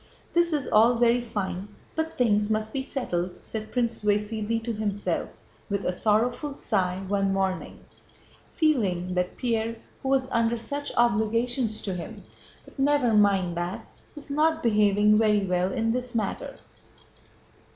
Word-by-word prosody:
"This 345 0 +3
is 295 -4 -1
all 230 +3 +5
very 240 +1 +3
fine, 200 -4 -4 0.3
but 320 0 -2
things 210 -4 +2
must 215 0 -1
be 270 - -1
settled," 180 -10 -3
said 220 -1 -6
Prince 235 -3 -1
Vasíli 210 +2 0
to 235 0 -2
himself, 205 -1 -2 0.3
with 200 -1 -2
a 180 - 0
sorrowful 235 - 0
sigh, 190 -7 -1
one 195 0 +1
morning, 190 -2 -2 0.7
feeling 195 - +1
that 180 0 -1
Pierre 230 -2 -1 0.3
who 265 - -3
was 265 -1 +2
under 230 0 +2
such 285 +5 -5
obligations 230 0 +1
to 195 - -2
him 175 -2 -7 0.4
("But - - -16
never 275 -4 +3
mind 195 -4 +3
that") 175 +2 -3 0.3
was 295 -1 -9
not 315 +2 +2
behaving 210 -1 +4
very 210 -2 +3
well 180 0 0
in 225 -2 0
this 250 0 -3
matter. 215 -4 -3
220 Hz, 145 wpm, -26 LUFS, 200-245 Hz, 0.7 s, all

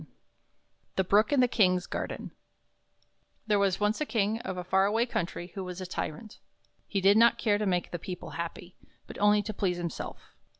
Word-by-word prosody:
34 - - -17 0.8
The 190 - +2
Brook 205 +7 +3
in 285 - +3
the 250 - +5
Kings 185 -6 +2
Garden - - -5
T - - -32 1.2
HERE 205 -1 +4
was 195 -2 +2
once 210 +5 +1
a - - +1
King 220 -1 0
of 190 -5 -5
a 180 - -3
far 190 +2 +3
away 225 +3 +2
country 175 -5 -4
who 195 - -5
was 180 0 -6
a 185 - -5
tyrant. 185 +3 -5 0.5
He 195 - -1
did 200 +2 +6
not 235 +1 +6
care 205 -3 +1
to 210 - 0
make 180 -2 0
the 175 - -4
people 180 +1 -7
happy, 170 +1 -6 0.3
but - - -10
only 205 0 +4
to 215 +1 -4
please 185 -3 -1
himself. 170 -1 -6
195 Hz, 205 wpm, -29 LUFS, 180-210 Hz, 1.2 s, did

